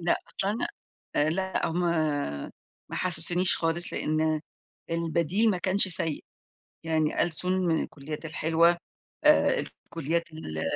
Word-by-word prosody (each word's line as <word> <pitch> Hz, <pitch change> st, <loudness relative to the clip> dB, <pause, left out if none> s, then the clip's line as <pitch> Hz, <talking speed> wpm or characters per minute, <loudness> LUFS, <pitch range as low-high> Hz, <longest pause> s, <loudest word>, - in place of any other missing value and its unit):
لأ، 170 Hz, 0 st, +2 dB
أصل 190 Hz, +3 st, -2 dB
انا 215 Hz, +3 st, 0 dB, 0.5 s
آآ، 150 Hz, +1 st, +3 dB
لأ 190 Hz, +3 st, -1 dB
هُم 170 Hz, +2 st, -1 dB, 1.1 s
ما -, -, -5 dB
حَسّسونيش 175 Hz, 0 st, +2 dB
خالص، 165 Hz, +1 st, -1 dB
لأن 155 Hz, 0 st, +1 dB, 0.5 s
البديل 170 Hz, +6 st, +1 dB
ما 185 Hz, -, 0 dB
كانش 190 Hz, +2 st, +3 dB
سيء، 165 Hz, -3 st, 0 dB, 0.6 s
يعني 160 Hz, -2 st, +1 dB
ألسُن 175 Hz, +2 st, 0 dB
من 165 Hz, -2 st, +2 dB
الكليات 150 Hz, +2 st, -7 dB
الحلوة، 165 Hz, +2 st, +3 dB, 0.5 s
آآ، -, -, +5 dB
الكليات 165 Hz, +1 st, -4 dB
ال 80 Hz, -, -5 dB
165 Hz, 125 wpm, -28 LUFS, 160-180 Hz, 1.1 s, آآ